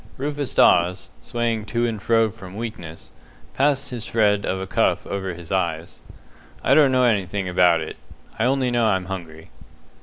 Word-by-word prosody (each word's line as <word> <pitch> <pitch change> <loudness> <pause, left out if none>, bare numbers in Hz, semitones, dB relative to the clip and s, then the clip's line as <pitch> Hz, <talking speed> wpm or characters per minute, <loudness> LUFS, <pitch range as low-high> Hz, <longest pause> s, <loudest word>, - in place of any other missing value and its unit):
Rufus 145 0 -3
Dawes, 90 +1 +3
swaying 115 -2 -2
to 115 +3 -1
and 110 -3 -3
fro 115 0 +2
from 95 0 -12
weakness, 105 -8 -8 0.4
passed 135 -1 +1
his 120 -3 -4
shred 105 -3 +1
of 95 - -1
a 95 - -4
cuff 95 - 0
over 95 -2 -4
his 85 -1 -11
eyes. 85 -3 -2 0.6
"I - - +3
don't 145 -3 +5
know 130 -1 +3
anything 100 -4 0
about 90 -2 +3
it. - - -7 0.4
I 110 - +2
only 130 -1 +1
know 120 -2 +2
I'm 95 -3 0
hungry." 85 -4 -8
105 Hz, 170 wpm, -22 LUFS, 90-120 Hz, 0.6 s, don't